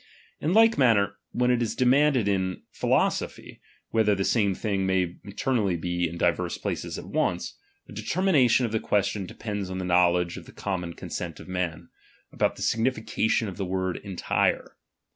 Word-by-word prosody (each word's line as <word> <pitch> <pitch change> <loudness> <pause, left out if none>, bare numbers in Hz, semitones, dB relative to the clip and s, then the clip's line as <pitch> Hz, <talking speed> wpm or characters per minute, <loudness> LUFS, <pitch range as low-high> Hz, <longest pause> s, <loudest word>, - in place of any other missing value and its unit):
In 165 +6 0
tike 225 -3 +5
manner, 100 -6 +3
when 125 0 +2
it 120 -1 +2
is 115 - -1
de 130 - +1
manded 135 -3 +4
in 95 -2 -1
philosophy, - - -1 0.3
whether 110 -2 +3
the 95 - -1
same 100 -5 +2
thing 100 -2 -1
may 90 -2 +1
entirely 100 -3 0
be 90 0 -1
in 85 - -7
divers - - 0
places - - -4
at - - -7
once; - - -2 0.3
the - - -13
de 105 - -5
termination 135 - +3
of 115 - -3
the 110 - 0
question 100 -2 0
depends 105 -3 -5
on 95 - -4
the 95 - -3
know 90 0 +4
ledge 90 -1 -1
of - - -10
the - - -12
common 90 -4 -3
consent 85 -3 -6
of - - -11
men, 90 -3 -3 0.4
about - - 0
the - - -6
signification 110 -1 +1
of 95 - -7
the 100 - -2
word 95 0 -1
entire. 95 -4 -1
100 Hz, 180 wpm, -26 LUFS, 90-115 Hz, 0.4 s, tike